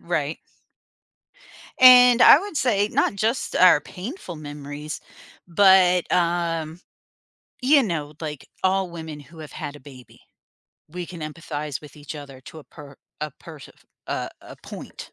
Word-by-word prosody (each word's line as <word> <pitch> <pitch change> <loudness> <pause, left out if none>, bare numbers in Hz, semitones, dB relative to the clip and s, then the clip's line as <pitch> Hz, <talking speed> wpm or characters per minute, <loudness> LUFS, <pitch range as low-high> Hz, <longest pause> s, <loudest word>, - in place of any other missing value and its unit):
Right. - - -3 1.4
And 250 -1 +8
I - - +9
would 390 -3 -7
say 210 -6 +1
not - - 0
just 225 +6 -1
our 180 -5 +6
painful 190 - -8
memories, 145 0 -8 0.5
but, 180 -1 +4
um, 170 -1 -1 0.8
you 275 +1 +4
know, 155 -6 -4
like 150 -3 -7 0.2
all 190 0 +1
women 160 -3 -8
who 155 +4 -15
have 155 -2 -10
had 145 - -7
a - - -12
baby, 130 -3 -15 0.7
we 175 +2 -7
can 175 -3 -10
empathize 150 -3 -6
with 150 -2 -15
each 145 +1 -9
other 140 -3 -10
to 160 - -12
a 150 - -13
per 140 -2 -14 0.2
a 150 -1 -3
persa 155 -4 -12 0.4
uh, - - -3
a - - -13
point, - - -10
165 Hz, 145 wpm, -23 LUFS, 150-190 Hz, 1.4 s, I